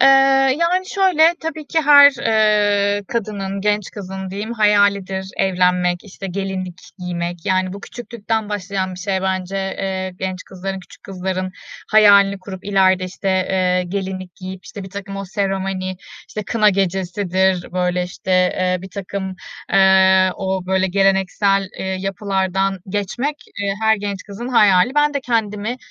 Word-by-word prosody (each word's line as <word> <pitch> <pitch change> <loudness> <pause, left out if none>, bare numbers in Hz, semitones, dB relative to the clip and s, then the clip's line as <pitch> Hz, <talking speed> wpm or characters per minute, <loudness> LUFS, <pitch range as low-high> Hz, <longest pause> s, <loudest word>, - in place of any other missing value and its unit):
Eee, 270 - +7 0.5
yani 365 +2 +1
şöyle, 350 -4 +4
tabii 315 -2 -5
ki 320 - +1
her, 285 -1 +8 0.2
eee, 205 -2 +2
kadının, 200 -4 -3
genç 210 0 0
kızın 190 -1 -7
diyeyim, 205 +4 -5
hayalidir 200 -3 +2
evlenmek, 180 -1 +1
işte, 195 -1 -8
gelinlik 185 -1 -4 0.2
giymek. 175 -1 -5
Yani, 185 -1 +1
bu 200 - -8
küçüklükten 225 -2 -4
başlayan 195 -2 -3
bir 180 - -10
şey 190 0 -2
bence, 190 0 -2
eee, 190 -1 -3
genç 185 -1 -4
kızların, 190 +1 -6
küçük - - -17
kızların 185 -1 -4 0.4
hayalini 200 -2 +6
kurup 190 0 -9
ileride, 190 -2 +3
işte, 190 +2 -5
eee, 185 -1 +1
gelinlik 185 -1 -5
giyip, 185 0 -8
işte, 200 - -9
birtakım 195 +1 -7
o 195 - -4
seremoni, 190 -1 -2 0.3
işte, 215 - -5
kına 215 0 +3
gecesidir, 190 -1 0
böyle, 180 0 0
işte, 180 +1 -7
eee, 185 0 +2
birtakım, 190 0 -5 0.4
eee, 190 -1 +5
o 190 -2 -3
böyle 190 0 +1
geleneksel, 195 +1 +1
eee, - - -4
yapılardan 195 0 -1
geçmek, 210 +9 -2 0.3
e, - - -1 0.2
her 220 0 +4
genç 200 -2 -5
kızın 215 +4 -7
hayali. 210 0 +4
Ben 295 0 +2
de 280 - 0
kendimi 225 -2 -2
195 Hz, 140 wpm, -19 LUFS, 185-205 Hz, 0.5 s, her